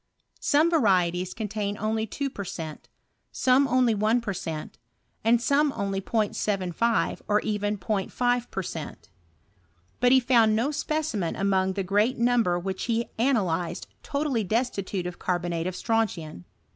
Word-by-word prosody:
Some 310 +4 +3
varieties 185 - +2
contain 210 -2 -3
only 220 +1 -1
2 275 +5 -3
per 200 - -5
cent., 160 -4 -7 0.4
some 265 +2 +3
only 255 -3 +3
1 215 +3 +2
per 225 -4 -3
cent., 160 -3 -6 0.4
and 230 +1 +4
some 285 +4 +2
only 195 -1 -2
0*75, 210 0 0
or 210 0 +3
even 205 -1 -1
0*5 235 +5 -1
per 190 - -3
•cent.; - - -7 0.9
but 245 0 +4
he 260 - +7
found 235 -4 +4
no 240 +7 +1
specimen 300 - -2
among 190 -1 +1
the 195 0 -2
great 205 +7 +1
miimber 235 -7 +2
which 190 +1 -4
he 235 0 -1
analyzed 190 -10 0 0.2
totally 280 -6 -1
destitute 200 -3 -1
of 180 0 -6
carbo 175 -1 -1
jiate 170 0 -2
of 185 - -4
strontian. 185 - -2
215 Hz, 145 wpm, -26 LUFS, 185-245 Hz, 0.9 s, he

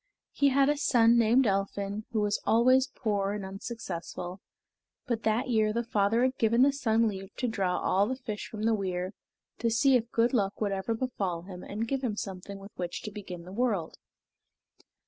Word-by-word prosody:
He 285 - +3
had 275 0 +4
a 295 0 +2
son 235 -4 +4
named 235 +3 +4
Elphin, 200 +1 -1
who 220 -2 0
was 205 0 0
always 255 +3 +4
poor 205 -6 -1
and 205 -2 -4
unsuccessful, 190 -3 -6 0.6
but 235 -2 -1
that 225 +4 +1
year 215 -3 +3
the 235 +2 -1
father 225 0 +2
had 260 0 0
given 230 +2 +4
the 280 0 +4
son 230 -4 +2
leave 195 -2 -5
to 250 - -1
draw 190 -5 0
all 200 +2 +2
the 260 - -1
fish 220 -5 -6
from 215 -1 -6
the 225 0 +3
weir, 185 -2 -2 0.5
to 230 - +1
see 260 +4 +4
if 235 -1 +1
good 235 +3 +2
luck 200 -5 0
would 205 -2 0
ever 195 +4 -1
befall 195 -9 -2
him 180 -1 -9
and 220 +3 -4
give 270 +2 -2
him 225 -5 -1
something 195 -1 -6
with 195 +1 -11
which 175 -1 -4
to 210 - -5
begin 190 -4 -8
the 180 - -11
world. 210 -8 -1
215 Hz, 195 wpm, -29 LUFS, 195-235 Hz, 0.6 s, had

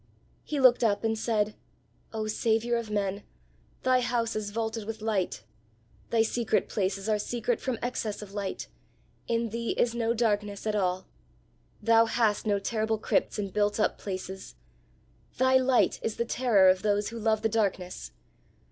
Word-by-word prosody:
He 295 - -3
looked 255 -2 +6
up 210 -2 +2
and 225 0 +1
said, 215 -1 0 0.6
"Oh 220 -1 -3
Saviour 225 +2 +1
of 230 -2 -3
men, 200 -1 -1 0.6
thy 255 0 +4
house 240 -2 -1
is 215 -1 -2
vaulted 220 0 -3
with 225 0 -5
light; 190 - -1 0.7
thy 225 -1 +3
secret 225 -1 0
places 195 0 -2
are 215 -1 +2
secret 240 +2 -1
from 255 -3 -2
excess 220 -4 -3
of 200 -1 -12
light; 200 -2 -4 0.6
in 230 0 0
thee 230 +1 -2
is 235 - +2
no 235 0 0
darkness 210 -3 0
at 215 - 0
all; 185 -2 0 0.8
thou 230 +1 +5
hast 225 -2 +1
no 205 -1 +3
terrible 220 +2 -1
crypts 215 - 0
and 200 -3 -3
built 205 0 +1
up 215 - +1
places; 190 - -6 0.8
thy 260 +1 +5
light 260 -1 +3
is 225 - -2
the 235 - -1
terror 230 -6 +4
of 185 0 +4
those 205 -1 +1
who 230 0 -7
love 220 -1 +1
the - - +4
darkness! 190 - -2
220 Hz, 165 wpm, -28 LUFS, 205-230 Hz, 0.8 s, looked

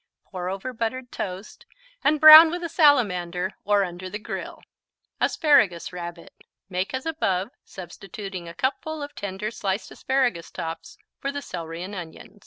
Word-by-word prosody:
Pour 180 -2 -4
over 195 +7 -5
buttered 245 +2 -4
toast 190 +1 -7 0.4
and 305 0 +3
brown 310 +2 +11
with 350 +2 -4
a 335 - -3
salamander 185 - +2
or 205 -1 +3
under 180 0 -6
the 205 - -5
grill. 210 - -7 0.6
Asparagus 220 - +2
Rabbit 175 -1 -8 0.4
Make 185 +7 -2
as 260 - -5
above, 205 - -1
substituting 190 0 -9
a 170 - -11
cupful 290 - -2
of 285 - -8
tender 200 +2 -5
sliced 200 -2 -3
asparagus 250 -11 -1
tops 165 -2 -7 0.2
for 275 - -3
the 285 0 -6
celery 165 -1 -6
and 195 +3 -7
onion. 180 +2 -9
200 Hz, 150 wpm, -24 LUFS, 180-265 Hz, 0.6 s, brown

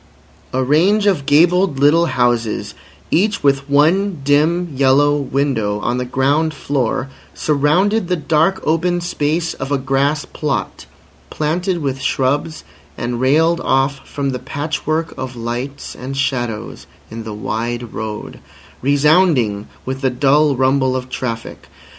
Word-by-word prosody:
A 130 0 0
range 180 +10 +3
of 175 -9 +1
gabled 170 +1 +4
little 155 +5 +4
houses, 120 -4 0 0.4
each 205 +5 +1
with 140 0 +1
one 165 +4 +2
dim 155 +4 +2
yellow 140 +2 +4
window, 135 -7 -1
on 120 +4 -1
the 125 - -2
ground 145 +5 +1
floor, 135 -2 -1 0.3
surrounded 175 +8 +1
the 180 - +1
dark 160 +3 +1
open 175 +3 +1
space 165 -1 -1
of 135 +1 -6
a 140 - +2
grass 140 +3 0
plot 145 -7 -4 0.4
planted 170 +3 -1
with 135 -1 -2
shrubs 140 +4 -1 0.3
and 120 0 -3
railed 160 +6 +3
off 135 +1 0
from 140 -1 -2
the 125 - -4
patchwork 155 +3 -3
of 130 -1 -5
lights 120 +4 -5
and 135 +2 -6
shadows 120 -5 -3 0.2
in 115 0 -6
the 110 - -7
wide 120 +2 -4
road, 110 -1 -6 0.4
resounding 140 - +3 0.2
with 130 +1 -4
the 135 - +2
dull 140 +3 +3
rumble 130 0 +2
of 130 0 -4
traffic. 115 -3 -5
140 Hz, 135 wpm, -18 LUFS, 130-160 Hz, 0.4 s, gabled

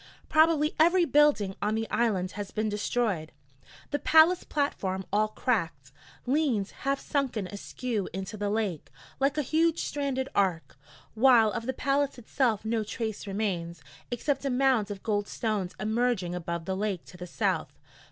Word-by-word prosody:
Probably 315 -1 +4
every 345 +2 +5
building 290 -11 +3
on 210 +2 0
the 225 0 -2
island 200 -6 +1
has 205 -1 -6
been 215 0 -1
destroyed; 210 -6 -1 0.6
the 290 - 0
palace 320 +4 +5
platform, 190 -10 -2
all 215 +1 +3
cracked, 165 - -2 0.3
leans 255 -7 +1
half 275 0 -2
sunken 260 -8 -1
askew 205 +3 -4
into 190 +3 -5
the 205 -1 -2
lake, 205 -7 -2 0.3
like 275 +2 +1
a 300 - +1
huge 325 +4 +1
stranded 275 -2 -2
ark, 185 -5 0 0.4
while 230 -2 +5
of 230 +4 -4
the - - +1
palace 275 +2 0
itself 230 -2 0
no 220 0 0
trace 220 -1 -4
remains, 175 -6 -3 0.3
except 270 +3 -1
a 275 - 0
mound 250 -5 +2
of 200 -2 -7
gold 205 -2 0
stones 210 -5 -2
emerging 215 -3 0
above 170 -1 -4
the 190 - -2
lake 195 -3 -2
to - - -14
the 180 0 -8
south. - - -1
220 Hz, 155 wpm, -28 LUFS, 195-270 Hz, 0.6 s, every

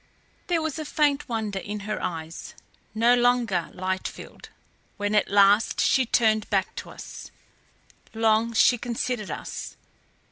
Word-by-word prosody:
There 335 -3 +1
was 315 -1 -3
a - - -3
faint 295 -2 0
wonder 215 -4 -2
in 205 +2 -6
her 215 +2 -4
eyes, 165 -1 -6 0.4
no 230 +2 +4
longer 240 -7 +2
light 185 0 -3
filled, - - -11 0.5
when 205 0 -1
at 210 - +2
last 205 +2 +4
she 260 -2 +3
turned 220 -2 +2
back 195 -2 0
to - - -6
us. - - -10 0.9
Long 225 +1 +2
she 240 +1 +4
considered 240 -2 -3
us. - - -6
220 Hz, 140 wpm, -25 LUFS, 205-245 Hz, 0.9 s, no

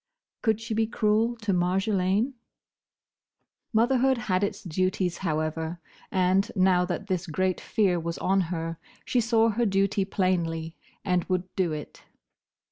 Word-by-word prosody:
Could 220 -2 +2
she 225 0 -4
be 220 0 +1
cruel 225 +1 +1
to 205 -3 +1
Marjolaine? 190 +5 +1 1.4
Motherhood 255 +3 +3
had 195 -5 0
its 200 - -2
duties, 185 +1 -1
however, 160 0 -2 0.3
and, 185 +1 +2
now 185 -2 +4
that 180 +2 -3
this 185 -3 -2
great 185 +3 0
fear 190 -5 +1
was 165 0 -4
on 195 +1 +2
her, 165 -1 -3 0.3
she 245 - +2
saw 230 0 +3
her 230 +2 +1
duty 195 0 +1
plainly, 170 -4 -1 0.3
and 180 -3 +1
would 185 0 -2
do 180 -4 +1
it. 150 -1 -7
185 Hz, 135 wpm, -27 LUFS, 175-215 Hz, 1.4 s, now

